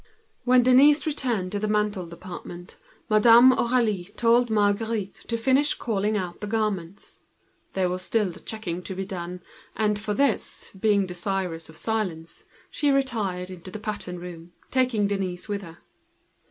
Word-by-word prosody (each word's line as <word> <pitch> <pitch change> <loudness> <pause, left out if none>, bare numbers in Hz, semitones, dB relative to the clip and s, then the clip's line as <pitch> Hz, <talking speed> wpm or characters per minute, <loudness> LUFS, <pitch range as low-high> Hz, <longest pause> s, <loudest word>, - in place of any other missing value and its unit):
When 250 0 +5
Denise 275 +5 +6
returned 245 -11 -1
to 205 - -2
the 215 - -1
ready 210 0 +2
made 175 -2 -7
department 175 0 -9 0.3
Madame 230 +3 +7
Aurélie 235 -7 +1
left 235 +1 +4
Marguerite 210 -1 0
to 230 - -1
finish 265 +5 +3
calling 210 -1 -1
out 180 -3 -5
the 210 - -4
garments. 200 -4 -3 0.5
There 190 -1 +1
was 180 +1 -3
still 220 +4 +1
a - - -2
lot 170 - -10
of - - -17
checking 180 -6 -4
to 190 +1 -6
be 195 +1 -3
done, 180 -2 -6 0.4
for 210 -1 0
which, 275 -3 0
desirous 190 -4 0
of 160 - -13
silence, 185 -8 -3 0.3
she 290 - +1
retired 215 -10 0
into 185 0 -9
the 185 - -6
pattern 210 -4 -5
room, 175 -1 -10 0.2
taking 250 -6 +2
the 205 - -1
young 185 -2 -2
girl 180 - -12
with 200 -1 -2
her. 170 -3 -11
205 Hz, 165 wpm, -25 LUFS, 180-230 Hz, 0.5 s, Madame